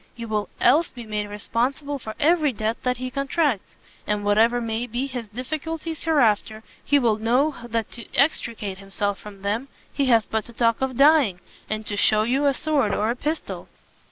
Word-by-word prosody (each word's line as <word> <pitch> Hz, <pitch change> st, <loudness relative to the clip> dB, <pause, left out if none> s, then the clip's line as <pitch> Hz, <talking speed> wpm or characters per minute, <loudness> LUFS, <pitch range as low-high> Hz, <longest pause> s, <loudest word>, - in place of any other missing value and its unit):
You 230 Hz, -1 st, -7 dB
will 210 Hz, -1 st, -2 dB
else 295 Hz, +7 st, +4 dB
be 240 Hz, -2 st, -10 dB
made 210 Hz, -1 st, -3 dB
responsible 255 Hz, +7 st, -2 dB
for 220 Hz, -3 st, -7 dB
every 310 Hz, -1 st, +3 dB
debt 220 Hz, +1 st, -2 dB
that 250 Hz, -1 st, 0 dB
he 255 Hz, +1 st, -5 dB
contracts; 275 Hz, -, -1 dB, 0.3 s
and 210 Hz, 0 st, 0 dB
whatever 225 Hz, +4 st, +4 dB
may 230 Hz, +1 st, -2 dB
be 245 Hz, +3 st, -2 dB
his 250 Hz, -4 st, -5 dB
difficulties 310 Hz, +7 st, -4 dB
hereafter, 220 Hz, -8 st, +2 dB, 0.2 s
he 285 Hz, -, +3 dB
will 230 Hz, -6 st, +2 dB
know 250 Hz, +7 st, +2 dB
that 230 Hz, -2 st, -3 dB
to 235 Hz, -, -9 dB
extricate 225 Hz, -9 st, +1 dB
himself 200 Hz, +1 st, -2 dB
from 200 Hz, -2 st, -12 dB
them, 215 Hz, +7 st, -1 dB, 0.3 s
he 275 Hz, -1 st, 0 dB
has 230 Hz, -3 st, +4 dB
but 220 Hz, -1 st, -2 dB
to 235 Hz, -, -12 dB
talk 230 Hz, 0 st, +1 dB
of 260 Hz, -2 st, -1 dB
dying, 280 Hz, -, +5 dB, 0.3 s
and 215 Hz, 0 st, -3 dB
to 205 Hz, -, -3 dB
shew 215 Hz, +1 st, +4 dB
you 265 Hz, +5 st, +1 dB
a 280 Hz, -, +4 dB
sword 280 Hz, -10 st, +1 dB
or 215 Hz, +2 st, +1 dB
a -, -, -2 dB
pistol." 305 Hz, +5 st, -4 dB
235 Hz, 185 wpm, -24 LUFS, 215-275 Hz, 0.3 s, dying